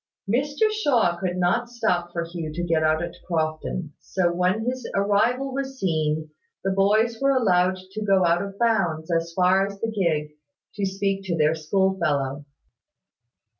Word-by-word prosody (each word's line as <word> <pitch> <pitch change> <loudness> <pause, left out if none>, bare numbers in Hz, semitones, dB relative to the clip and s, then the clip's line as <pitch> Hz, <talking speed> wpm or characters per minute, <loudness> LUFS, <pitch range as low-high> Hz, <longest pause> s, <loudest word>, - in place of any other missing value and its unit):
Mr 285 - +1
Shaw 250 - +2
could 185 -1 -2
not 205 +7 +1
stop 210 -8 -1
for 170 -1 -2
Hugh 165 -2 -5
to 175 +2 -3
get 165 -2 +1
out 155 +1 +2
at 170 - -5
Crofton; 155 -1 -2
so, 175 -2 0
when 185 +5 +1
his 250 -1 -3
arrival 225 +7 +1
was 270 0 -4
seen, 155 -3 -1 0.3
the 195 - 0
boys 215 +4 +2
were 275 - +3
allowed 185 -6 +3
to 215 +2 -4
go 195 -3 +3
out 170 +1 +3
of 200 0 -6
bounds, 180 -9 +1
as 165 0 0
far 185 +1 +4
as 200 0 -9
the 225 +1 -2
gig, 160 -7 0 0.4
to 200 -2 -1
speak 195 0 -1
to 170 -3 -1
their 155 0 +3
school 190 +5 0
fellow. 145 -3 -1
185 Hz, 170 wpm, -24 LUFS, 165-215 Hz, 0.4 s, far